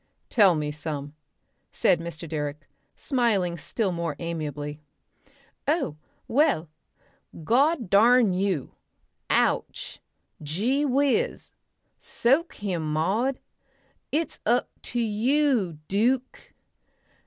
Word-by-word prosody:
"Tell 200 -7 +5
me 150 -1 -2
some," 145 -1 -5 0.6
said 170 - +3
Mr. 170 0 -6
Direck, 150 -1 -4 0.3
smiling 220 -10 +1
still 200 +5 -1
more 170 -3 -3
amiably. 150 -3 -5 0.9
"Oh! 285 - 0 0.3
Well 225 - +2 0.7
God 265 - +2
darn 225 +2 +5
you! 185 -7 -1 0.6
Ouch, - - 0 0.4
Gee 205 - 0
whizz! 285 - 0 0.5
Soak 275 +8 +1
him, 175 -7 -3
Maud! 220 - 0 0.7
It's 310 0 -1
up 240 +3 +1
to 240 - -3
you, 235 - +1
Duke...." 245 +6 0
200 Hz, 90 wpm, -26 LUFS, 160-255 Hz, 0.9 s, Tell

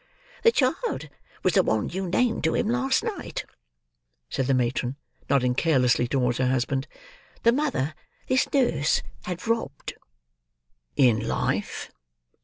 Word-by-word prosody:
"The 460 - +6
child 325 - 0 0.3
was - - +3
the - - +6
one - - 0
you 190 -1 -3
named 235 +5 +1
to 160 - +2
him - - +1
last 265 - +1
night," 440 -5 -4 0.9
said 130 - -1
the 135 - +3
matron, 125 +1 0 0.3
nodding 125 -3 +3
carelessly 125 -4 +3
towards 125 -2 0
her 130 - +2
husband; 130 +2 0 0.6
"the 235 - +6
mother 245 - 0 0.3
this 260 0 +1
nurse 165 - +2 0.2
had 180 0 -5
robbed." 230 0 -2 1.0
"In 115 -4 +3
life?" - - -2
155 Hz, 130 wpm, -26 LUFS, -, 1.0 s, The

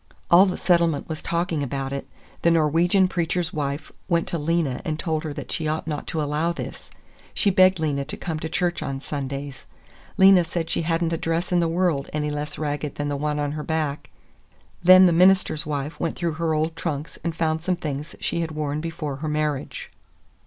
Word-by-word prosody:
All 185 +3 +8
the 185 - -2
settlement 170 -4 +2
was 155 -1 -4
talking 170 -2 -1
about 135 0 -3
it. 140 - -5 0.3
The 170 - +4
Norwegian 170 +4 +3
preacher's 175 -1 -1
wife 145 -1 -3 0.2
went 170 -2 +1
to 170 - -2
Lena 150 -4 0
and 155 -2 -2
told 155 -1 -2
her 155 - -4 0.2
she 160 - -2
ought 155 +1 -2
not 150 -2 -4
to 155 -2 -1
allow 150 +3 0
this; - - -7 0.5
she 200 - +2
begged 185 -1 +5
Lena 145 -3 0
to - - -7
come 160 -3 -4
to 160 - -4
church 175 +1 0
on 135 0 -3
Sundays. 140 -1 -5 0.5
Lena 190 -2 +7
said 165 0 -3
she - - 0
had 165 +1 0
n't 165 0 0
a - - 0
dress 165 +3 -1
in 175 - +3
the 170 - +2
world 165 -4 0
any 150 0 -1
less 150 +1 -4
ragged 150 -1 -3
than 145 0 -2
the 145 - -1
one 150 +1 -1
on 145 -1 -1
her 150 0 -4
back. 155 -3 -2 0.7
Then 185 +1 +8
the 175 - +4
minister's 180 -3 +4
wife 145 0 -3
went 165 - -1
through 170 -2 -1
her 160 -1 +1
old 160 +1 0
trunks 155 -2 -4
and 170 -2 -2
found 160 -1 0
some 180 +2 0
things 150 -2 -5
she 170 - -1
had 165 - -2
worn 150 0 -2
before 155 -4 -4
her 155 +2 -3
marriage. 150 -2 -2
160 Hz, 205 wpm, -24 LUFS, 150-170 Hz, 0.7 s, All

